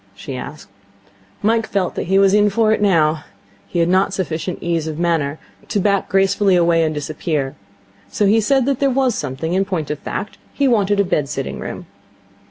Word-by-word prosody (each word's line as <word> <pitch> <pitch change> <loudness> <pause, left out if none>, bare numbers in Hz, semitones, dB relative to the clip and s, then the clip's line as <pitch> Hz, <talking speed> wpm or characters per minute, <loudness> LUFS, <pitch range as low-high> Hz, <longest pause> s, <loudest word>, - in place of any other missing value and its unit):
she 130 +7 -7
asked. 145 +4 -8 0.8
Mike 225 +1 +2
felt 190 -3 -1
that - - -4
he 190 +2 +3
was 195 0 +4
in 210 0 +4
for 215 +2 +2
it 220 - -1
now. 160 -6 +2 0.4
He - - -5
had 170 0 +3
not 190 +2 +2
sufficient 175 -1 -3
ease 165 -2 -1
of 155 -1 -4
manner 165 -4 0 0.3
to 205 - -1
back 200 0 +1
gracefully 195 0 +3
away 170 -1 +3
and 155 - 0
disappear, 150 -2 -3 0.6
so 210 - 0
he 220 +3 +4
said 265 +3 +2
that 275 -2 0
there 275 - +3
was 260 -1 +1
something. 145 +1 -3
In 190 +1 +2
point 175 -7 -3
of 150 - -4
fact, 205 - -6 0.2
he 280 - +2
wanted 205 -4 +2
a - - +5
bed 150 -7 -1
sitting - - -4
room. - - -6
185 Hz, 195 wpm, -19 LUFS, 160-205 Hz, 0.8 s, a